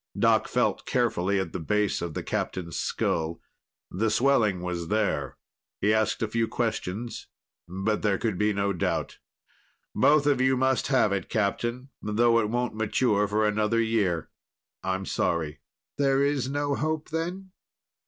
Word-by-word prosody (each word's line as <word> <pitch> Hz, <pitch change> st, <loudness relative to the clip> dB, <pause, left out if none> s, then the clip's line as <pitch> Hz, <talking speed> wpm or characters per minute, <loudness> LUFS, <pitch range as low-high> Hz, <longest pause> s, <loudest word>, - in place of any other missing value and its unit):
Doc -, -, +3 dB
felt -, -, 0 dB
carefully 100 Hz, -6 st, +1 dB
at 95 Hz, -4 st, -3 dB
the -, -, -3 dB
base 105 Hz, +4 st, 0 dB
of 85 Hz, -3 st, -4 dB
the -, -, -3 dB
Captain's 85 Hz, -3 st, -3 dB
skull; 80 Hz, 0 st, -1 dB, 0.5 s
the 110 Hz, +5 st, 0 dB
swelling 110 Hz, -5 st, +3 dB
was 90 Hz, -2 st, -3 dB
there. 105 Hz, +1 st, -1 dB, 0.4 s
He 105 Hz, +2 st, +3 dB
asked 110 Hz, +1 st, +1 dB
a -, -, +1 dB
few 115 Hz, +1 st, 0 dB
questions, 110 Hz, -1 st, -3 dB, 0.4 s
but 95 Hz, +4 st, -1 dB
there 100 Hz, -2 st, +2 dB
could 110 Hz, -4 st, -2 dB
be 105 Hz, 0 st, +3 dB
no 100 Hz, 0 st, 0 dB
doubt. 90 Hz, -, -2 dB, 0.7 s
"Both 150 Hz, 0 st, +4 dB
of 140 Hz, -3 st, +3 dB
you 130 Hz, 0 st, +3 dB
must 130 Hz, 0 st, +1 dB
have 130 Hz, -7 st, +3 dB
it, 95 Hz, -2 st, -2 dB
Captain, 120 Hz, +5 st, -1 dB
though 115 Hz, +2 st, +3 dB
it 105 Hz, -2 st, 0 dB
won't 120 Hz, +1 st, -1 dB
mature 110 Hz, -1 st, +1 dB
for 105 Hz, +2 st, +1 dB
another 105 Hz, +2 st, +1 dB
year. 105 Hz, -8 st, 0 dB, 0.5 s
I'm 95 Hz, 0 st, -2 dB
sorry." 80 Hz, -5 st, -1 dB, 0.4 s
"There's 140 Hz, -1 st, +2 dB
no 145 Hz, 0 st, -1 dB
hope, 155 Hz, +1 st, -2 dB
then?" 180 Hz, +4 st, -4 dB
110 Hz, 150 wpm, -27 LUFS, 95-125 Hz, 0.7 s, Both